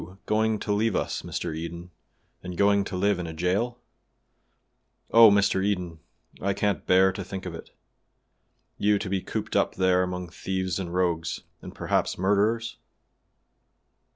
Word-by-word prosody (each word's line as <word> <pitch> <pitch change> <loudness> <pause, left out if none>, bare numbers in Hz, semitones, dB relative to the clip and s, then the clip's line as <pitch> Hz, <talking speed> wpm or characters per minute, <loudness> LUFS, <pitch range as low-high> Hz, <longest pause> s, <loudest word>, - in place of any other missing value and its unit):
"You 95 +2 -11
going 110 0 +1
to 105 - -1
leave 110 0 +1
us, - - -1
Mr. 85 -3 -4
Eden, 85 +2 -7 0.5
and 90 -1 -7
going 100 0 +4
to 95 - -5
live 100 0 +1
in 85 - -4
a 80 - -7
jail? 95 +9 0 1.3
Oh! 115 -1 +9
Mr. 100 -1 +3
Eden, 90 -5 -2 0.4
I 100 +1 0
can't 105 -1 -1
bear 95 +1 +5
to 95 +1 -6
think 95 0 -7
of 90 - -5
it. 80 - -9 1.1
You 105 0 +3
to 100 -1 -4
be 95 -1 0
cooped - - -4
up - - +2
there 95 -1 +3
among 90 -1 -3
thieves 95 +1 -3
and 90 -3 -4
rogues, 85 -2 -1 0.2
and - - -10
perhaps - - 0
murderers?" 105 +5 +1
95 Hz, 155 wpm, -26 LUFS, 90-100 Hz, 1.3 s, Oh